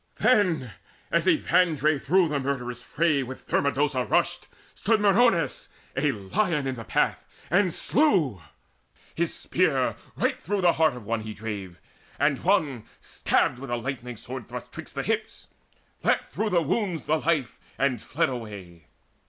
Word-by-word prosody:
Then, 170 Hz, -, +2 dB, 0.4 s
as -, -, +2 dB
Evandre 155 Hz, -5 st, +3 dB
through 180 Hz, +3 st, +3 dB
the 145 Hz, -1 st, 0 dB
murderous 125 Hz, -3 st, -3 dB
fray 155 Hz, +1 st, +1 dB
With 130 Hz, 0 st, -7 dB
Thermodosa 140 Hz, -2 st, +1 dB
rushed, -, -, 0 dB, 0.3 s
stood 220 Hz, +1 st, +1 dB
Meriones, 200 Hz, -, +3 dB, 0.3 s
A 145 Hz, +2 st, +2 dB
lion 145 Hz, -, -1 dB
in 135 Hz, -, -1 dB
the 115 Hz, -3 st, -7 dB
path, -, -, 0 dB, 0.3 s
and 180 Hz, +1 st, +3 dB
slew: 175 Hz, -, +2 dB, 0.7 s
his -, -, 0 dB
spear -, -, +1 dB, 0.2 s
Right -, -, -1 dB
to 205 Hz, +4 st, 0 dB
the 175 Hz, -2 st, +4 dB
heart 160 Hz, -4 st, +2 dB
of 120 Hz, -4 st, -10 dB
one 115 Hz, +1 st, -1 dB
he 110 Hz, 0 st, -7 dB
drave, 100 Hz, -5 st, -6 dB, 0.4 s
and 140 Hz, -3 st, +1 dB
one 150 Hz, -, +1 dB
Stabbed 125 Hz, -, 0 dB
with 135 Hz, 0 st, -8 dB
a 120 Hz, -, 0 dB
lightning 125 Hz, -1 st, -5 dB
sword 125 Hz, +1 st, -7 dB
thrust -, -, -7 dB
'twixt -, -, -9 dB
the -, -, -2 dB
hips: -, -, -3 dB, 0.6 s
Leapt -, -, +1 dB
through 215 Hz, +3 st, -1 dB
the 175 Hz, -4 st, +2 dB
wounds 185 Hz, +1 st, -1 dB
the 155 Hz, -, +2 dB
life, 155 Hz, -8 st, 0 dB, 0.2 s
and 130 Hz, -5 st, +1 dB
fled -, -, 0 dB
away. 100 Hz, -, -8 dB
140 Hz, 150 wpm, -26 LUFS, 120-175 Hz, 0.7 s, the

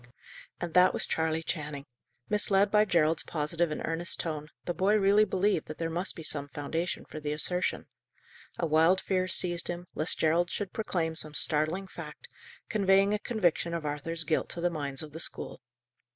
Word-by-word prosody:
And 170 Hz, -2 st, -4 dB
that 180 Hz, 0 st, +5 dB
was -, -, -2 dB
Charley 160 Hz, 0 st, 0 dB
Channing. 150 Hz, -4 st, -4 dB, 0.4 s
Misled 200 Hz, -1 st, +3 dB
by 210 Hz, 0 st, +5 dB
Gerald's 165 Hz, -4 st, +2 dB
positive 165 Hz, +2 st, -1 dB
and 155 Hz, -, -4 dB
earnest 165 Hz, +1 st, -1 dB
tone, 155 Hz, -2 st, -3 dB, 0.2 s
the 175 Hz, -, -1 dB
boy 195 Hz, +4 st, +2 dB
really 205 Hz, +1 st, +5 dB
believed 190 Hz, -3 st, +1 dB
that 155 Hz, -, -7 dB
there 165 Hz, -1 st, -2 dB
must 175 Hz, +4 st, 0 dB
be 165 Hz, -, -8 dB
some 145 Hz, -2 st, 0 dB
foundation 160 Hz, +5 st, -3 dB
for 155 Hz, -, -8 dB
the 150 Hz, -1 st, -3 dB
assertion. 180 Hz, +4 st, 0 dB, 0.7 s
A 170 Hz, -, 0 dB
wild 165 Hz, +4 st, +4 dB
fear 185 Hz, -1 st, 0 dB
seized 175 Hz, -1 st, +1 dB
him, 175 Hz, 0 st, -4 dB
lest 155 Hz, -, +1 dB
Gerald 170 Hz, +2 st, +2 dB
should 200 Hz, 0 st, -4 dB
proclaim 170 Hz, -7 st, -1 dB
some 155 Hz, -1 st, -3 dB
startling 155 Hz, +5 st, +1 dB
fact, 190 Hz, -, -9 dB, 0.4 s
conveying 195 Hz, -1 st, +3 dB
a 210 Hz, -, 0 dB
conviction 175 Hz, -7 st, 0 dB
of 165 Hz, -2 st, -4 dB
Arthur's 155 Hz, +3 st, -2 dB
guilt 155 Hz, 0 st, 0 dB
to -, -, -3 dB
the 175 Hz, 0 st, +1 dB
minds 140 Hz, -3 st, -3 dB
of 155 Hz, -, -9 dB
the 160 Hz, -, -8 dB
school. 165 Hz, -, -5 dB
170 Hz, 180 wpm, -29 LUFS, 155-185 Hz, 0.7 s, that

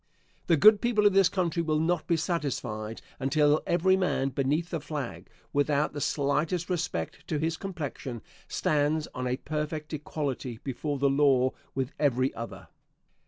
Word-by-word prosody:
The 165 Hz, -, +4 dB
good 210 Hz, +7 st, +7 dB
people 225 Hz, -3 st, +2 dB
of 205 Hz, -, +6 dB
this 195 Hz, -2 st, +5 dB
country 175 Hz, -2 st, 0 dB
will 155 Hz, -2 st, +1 dB
not 165 Hz, +1 st, 0 dB
be 170 Hz, -, +2 dB
satisfied 130 Hz, -, -3 dB, 0.2 s
until 145 Hz, +3 st, +3 dB
every 185 Hz, +2 st, +4 dB
man 180 Hz, -8 st, +1 dB
beneath 145 Hz, +6 st, 0 dB
the 165 Hz, -, -1 dB
flag, 130 Hz, -, -6 dB, 0.2 s
without 145 Hz, +1 st, +1 dB
the 145 Hz, -, -4 dB
slightest 155 Hz, +6 st, 0 dB
respect 175 Hz, 0 st, -3 dB
to 155 Hz, -, -1 dB
his 160 Hz, +2 st, 0 dB
complexion, 145 Hz, -, -5 dB, 0.2 s
stands 150 Hz, +1 st, +1 dB
on 125 Hz, 0 st, -3 dB
a 125 Hz, +1 st, 0 dB
perfect 150 Hz, +1 st, -4 dB
equality 140 Hz, -5 st, -4 dB
before 140 Hz, +2 st, -3 dB
the 140 Hz, +1 st, +2 dB
law 135 Hz, -2 st, +4 dB, 0.2 s
with 130 Hz, 0 st, -1 dB
every 130 Hz, -3 st, +2 dB
other. 115 Hz, 0 st, -8 dB
150 Hz, 155 wpm, -28 LUFS, 135-170 Hz, 0.2 s, good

